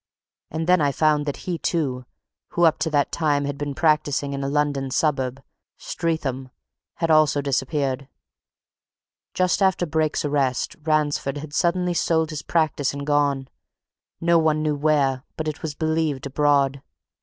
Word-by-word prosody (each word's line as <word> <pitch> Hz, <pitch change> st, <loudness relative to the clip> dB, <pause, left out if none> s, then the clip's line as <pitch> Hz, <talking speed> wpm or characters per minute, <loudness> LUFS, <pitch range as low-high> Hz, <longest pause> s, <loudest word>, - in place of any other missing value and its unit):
And 160 Hz, +1 st, -3 dB
then 180 Hz, -1 st, +4 dB
I 145 Hz, -1 st, +2 dB
found 150 Hz, 0 st, +2 dB
that 145 Hz, -, -2 dB
he, 175 Hz, -3 st, -2 dB
too, 130 Hz, -7 st, -1 dB, 0.5 s
who 175 Hz, -, +1 dB
up 160 Hz, -2 st, +4 dB
to 160 Hz, +1 st, 0 dB
that 145 Hz, -2 st, +1 dB
time 145 Hz, -3 st, +1 dB
had 145 Hz, 0 st, -3 dB
been 145 Hz, -1 st, -4 dB
practising 150 Hz, -3 st, +1 dB
in 140 Hz, 0 st, -3 dB
a 135 Hz, -, -1 dB
London 145 Hz, -2 st, 0 dB
suburb 135 Hz, -2 st, -1 dB, 0.3 s
Streatham 135 Hz, -6 st, -3 dB, 0.5 s
had 165 Hz, -1 st, 0 dB
also 155 Hz, -2 st, +4 dB
disappeared. 135 Hz, -1 st, -1 dB, 1.3 s
Just 185 Hz, +2 st, +1 dB
after 190 Hz, -2 st, +2 dB
Brake's 155 Hz, -1 st, 0 dB
arrest, 140 Hz, -4 st, 0 dB
Ransford 150 Hz, -2 st, 0 dB
had 145 Hz, 0 st, -8 dB
suddenly 180 Hz, +1 st, +1 dB
sold 160 Hz, -1 st, +1 dB
his 155 Hz, -1 st, -4 dB
practice 150 Hz, -4 st, 0 dB
and 140 Hz, 0 st, -5 dB
gone 145 Hz, -2 st, +1 dB, 0.7 s
no 170 Hz, 0 st, +3 dB
one 155 Hz, -1 st, +1 dB
knew 150 Hz, -1 st, +1 dB
where, 140 Hz, -3 st, +1 dB, 0.2 s
but 155 Hz, -, -3 dB
it 155 Hz, -, -4 dB
was 155 Hz, -2 st, -4 dB
believed 160 Hz, -3 st, -1 dB
abroad. 140 Hz, -1 st, +2 dB
150 Hz, 155 wpm, -23 LUFS, 140-160 Hz, 1.3 s, then